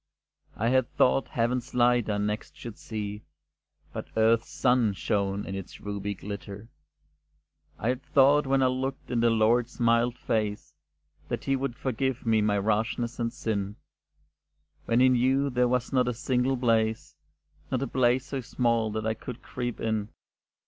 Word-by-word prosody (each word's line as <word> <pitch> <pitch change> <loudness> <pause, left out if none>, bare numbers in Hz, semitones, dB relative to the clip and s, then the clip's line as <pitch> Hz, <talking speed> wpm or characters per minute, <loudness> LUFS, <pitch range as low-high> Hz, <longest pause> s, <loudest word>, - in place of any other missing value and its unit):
I 115 +3 0
had 130 +1 +2
thought 130 +1 +3
Heaven's 125 +2 -1
light 120 -2 +3
I 105 - 0
next 105 +1 -3
should 115 -3 -9
see, 105 -2 -5 0.7
But - - -5
earth's 115 +1 +3
sun 125 -4 +2
shone 100 +2 -1
in 95 - -5
its 95 -1 -7
ruby 100 0 -4
glitter; 100 +2 -8 1.1
I 115 - -1
had 125 +1 -1
thought 140 +1 +4
when 135 0 +3
I - - +4
looked 130 +1 -2
in 120 - +1
the 115 0 +4
Lord's 115 +2 +2
mild 120 +1 +2
face, 105 -2 -2 0.5
That - - -3
He 135 - +1
would 135 -2 -3
forgive 130 +1 -2
my 105 -2 +2
rashness 110 +4 -1
and 115 -1 -1
sin, 100 -3 -3 1.1
When 115 +2 +2
He 130 - +6
knew 130 +3 +2
there 125 0 +2
was 125 +1 -1
not 125 -2 +3
a 125 - -1
single 130 +2 0
place, 115 -2 0 0.5
Not 130 0 -1
a - - -2
place 125 0 +2
so 135 -2 -4
small 115 -2 0
that 110 0 -3
I 110 - +1
could 120 +2 -9
creep 120 -2 -4
in. 110 -2 -1
115 Hz, 160 wpm, -27 LUFS, 110-125 Hz, 1.1 s, He